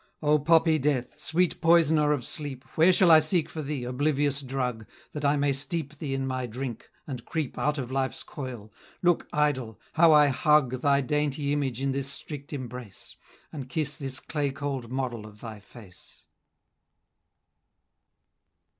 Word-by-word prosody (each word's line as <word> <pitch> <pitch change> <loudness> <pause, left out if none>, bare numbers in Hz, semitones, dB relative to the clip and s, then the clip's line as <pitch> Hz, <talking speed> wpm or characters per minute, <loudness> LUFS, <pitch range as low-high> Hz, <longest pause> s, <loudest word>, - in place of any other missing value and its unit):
"O 150 0 +4
poppy 160 +1 +4
Death! 130 -3 -1
sweet 175 +2 0
poisoner 160 -3 +4
of 145 -5 0
sleep; 145 -4 -4
Where 165 +4 +5
shall 180 -1 +5
I 160 - +9
seek 155 +1 +1
for 160 - -6
thee, 140 -3 -4
oblivious 140 +2 0
drug, 125 -4 -3 0.2
That 150 - -6
I 145 +1 +3
may 140 0 +2
steep 145 +1 -3
thee 140 -4 -3
in 135 0 -2
my 130 -1 -2
drink, 120 0 -6 0.2
and 130 -5 -6
creep 155 -5 -3
Out 150 0 0
of 130 -2 -4
life's 135 0 -1
coil? 120 -6 -8 0.3
Look, 175 -1 +2
Idol! 130 -7 0
how 165 0 +6
I 150 -1 +6
hug 135 -2 +2
Thy 140 -1 +3
dainty 145 +1 -1
image 135 -5 -1
in 135 0 0
this 135 0 -2
strict 145 -1 -6
embrace, 125 - -8 0.4
And 135 -4 -7
kiss 150 +1 -1
this 135 -3 -4
clay 145 -1 -2
cold 135 -3 -4
model 125 -5 -3
of 105 0 -15
thy 110 -2 -8
face!" 100 -2 -16
140 Hz, 160 wpm, -27 LUFS, 130-150 Hz, 0.4 s, I